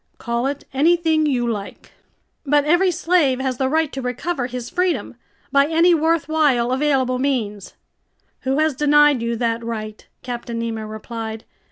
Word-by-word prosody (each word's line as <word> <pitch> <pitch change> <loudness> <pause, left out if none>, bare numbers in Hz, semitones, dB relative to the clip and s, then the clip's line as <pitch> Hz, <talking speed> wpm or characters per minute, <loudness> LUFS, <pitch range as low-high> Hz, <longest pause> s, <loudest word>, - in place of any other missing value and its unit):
"Call 235 +2 -2
it 280 0 -4
anything 320 +1 +2
you 245 -4 0
like." 210 -4 -6 0.5
"But 290 0 +2
every 350 +5 +3
slave 335 -6 +2
has 260 -2 -2
the 265 0 0
right 315 0 +1
to 270 - -4
recover 250 +2 -3
his 250 -1 -6
freedom! 360 +4 -1 0.4
By 280 0 +4
any 335 +2 +4
worthwhile, 310 -6 +2
available 260 -2 +1
means!" 220 -8 -2 0.6
"Who 265 +1 -1
has 310 0 +2
denied 295 -1 +4
you 235 0 -1
that 230 0 -1
right?" 215 -2 -6 0.2
Captain 240 -2 -5
Nemo 225 -2 -4
replied. 220 0 -7
265 Hz, 150 wpm, -21 LUFS, 235-310 Hz, 0.6 s, By